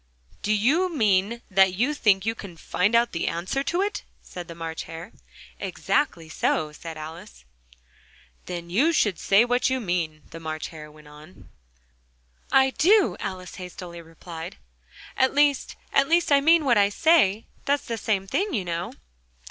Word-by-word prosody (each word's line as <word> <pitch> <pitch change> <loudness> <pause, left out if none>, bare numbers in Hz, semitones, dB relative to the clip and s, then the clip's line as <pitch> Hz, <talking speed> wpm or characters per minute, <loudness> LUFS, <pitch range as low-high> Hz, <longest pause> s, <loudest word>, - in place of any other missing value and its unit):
"Do 210 - -1
you 275 - +2
mean 220 - +1
that 190 -1 +4
you 250 +9 +1
think 205 -8 +2
you 225 - +1
can 195 -6 -10
find 190 +7 0
out 235 +1 +3
the 165 - -2
answer 175 +11 -2
to 355 +3 +1
it?" 415 0 -3 0.2
said 175 -2 -9
the 170 - -9
March 165 -1 -5
Hare. 165 +5 -9 0.5
"Exactly 175 - -1
so," 155 -1 -1
said 160 +1 -9
Alice. 155 - -10 1.0
"Then 170 -1 -6
you 285 - +3
should 205 - +1
say 200 +4 +4
what 245 +2 +1
you 260 0 0
mean," 170 - -2
the 165 - -8
March 155 -1 -5
Hare 155 -2 -10
went 150 0 -17
on. 150 - -15 1.0
"I 265 0 +5
do," 390 +8 +4
Alice 185 -1 -6
hastily 180 -1 -8
replied; 165 - -9 0.6
"at 260 +1 +2
least 290 -1 +2 0.2
at 275 0 +3
least 340 -1 +3
I 280 -1 +6
mean 325 +1 +5
what 240 -5 +4
I 200 0 +4
say 225 - +3 0.2
that's 285 0 +1
the 230 - -3
same 205 -3 -1
thing, 380 - -1
you 195 -5 -2
know." 170 0 -3
195 Hz, 165 wpm, -25 LUFS, 165-265 Hz, 1.0 s, I